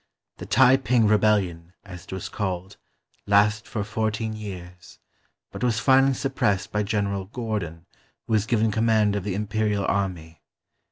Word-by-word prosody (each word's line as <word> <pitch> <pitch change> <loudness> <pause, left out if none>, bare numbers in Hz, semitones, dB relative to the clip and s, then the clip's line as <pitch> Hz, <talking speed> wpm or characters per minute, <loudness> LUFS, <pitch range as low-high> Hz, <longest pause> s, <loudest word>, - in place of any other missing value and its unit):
TheTai 125 +8 +4
ping 120 -3 +3
Rebellion, 100 -5 +1
as 90 -2 -10
it - - -13
was 95 -1 -5
called, 95 -1 -4 0.5
lasted 105 +2 +3
for 105 - -2
fourteen 110 +1 -2
years, 90 -5 -9 0.5
but - - -7
was 120 -3 +1
finally 135 +2 +4
suppressed 105 -6 -1
by 105 - 0
General 100 -2 -1
Gordon 100 -7 -5 0.4
who 115 - -3
was 110 0 +2
given 110 -2 +2
command 110 -1 +2
of 100 - -2
the 100 -2 -3
Imperial 105 0 -1
army. 85 -5 -3
105 Hz, 145 wpm, -24 LUFS, 95-110 Hz, 0.5 s, TheTai